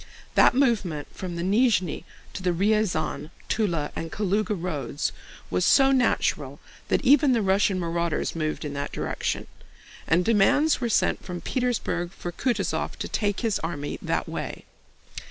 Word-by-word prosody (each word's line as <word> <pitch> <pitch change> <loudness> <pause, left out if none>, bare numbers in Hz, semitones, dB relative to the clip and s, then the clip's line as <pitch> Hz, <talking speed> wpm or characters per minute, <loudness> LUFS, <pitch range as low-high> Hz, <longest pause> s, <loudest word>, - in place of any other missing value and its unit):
That - - +5
movement 205 - +1
from 180 -2 -5
the 170 - -3
Nízhni 200 -3 +2 0.3
to - - -6
the 185 - +1
Ryazán, 180 -5 0 0.2
Túla, 170 -9 0
and 165 0 -5
Kalúga 210 0 0
roads 150 -5 -2 0.4
was 90 0 +1
so 270 -1 +5
natural 260 -2 +1 0.3
that - - 0
even 275 0 +6
the 230 - +2
Russian 195 0 +2
marauders 170 -1 -1
moved 155 -1 -2
in 145 - -4
that 140 0 -4
direction, - - -2 0.6
and 175 +2 +3
demands 245 +8 +3
were 240 - 0
sent - - +1
from 180 -2 -5
Petersburg 230 -8 -2
for 175 - -6
Kutúzov 245 +7 -1
to - - -5
take 205 -2 -1
his 225 -4 0
army 145 -3 -4
that - - -1
way. - - -5
190 Hz, 150 wpm, -25 LUFS, 170-230 Hz, 0.6 s, even